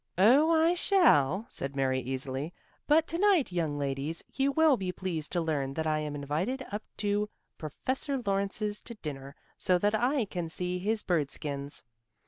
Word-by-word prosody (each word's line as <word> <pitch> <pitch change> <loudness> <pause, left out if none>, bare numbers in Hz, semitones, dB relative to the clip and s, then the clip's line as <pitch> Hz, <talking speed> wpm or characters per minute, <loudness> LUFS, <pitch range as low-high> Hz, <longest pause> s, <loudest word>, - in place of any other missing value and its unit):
"Oh, 255 - +6
I 330 +1 +4
shall," 225 - +3
said 135 0 -5
Mary 130 -1 +1
easily. 130 +4 -3 0.4
"But 310 +2 +5
to 335 - -1
night, 385 - +4
young 160 -5 -1
ladies, 140 +3 -2
you 275 +1 +1
will 315 0 +5
be 190 -5 -3
pleased 175 -5 -3
to 175 - +1
learn 140 -4 -1
that 160 - -1
I 155 -1 +1
am 150 -1 -4
invited 165 - -2
up 205 +1 -3 0.2
to 205 0 0 0.3
Professor 260 - -2
Lawrence's 200 +1 0
to 235 - -9
dinner, 140 -6 -7 0.2
so 180 -1 +3
that 205 +4 +1
I 245 +3 +2
can 175 -4 -4
see 180 +2 -2
his 215 +3 0
bird 155 -6 +1
skins. 140 -1 -4
180 Hz, 170 wpm, -30 LUFS, 145-245 Hz, 0.4 s, Oh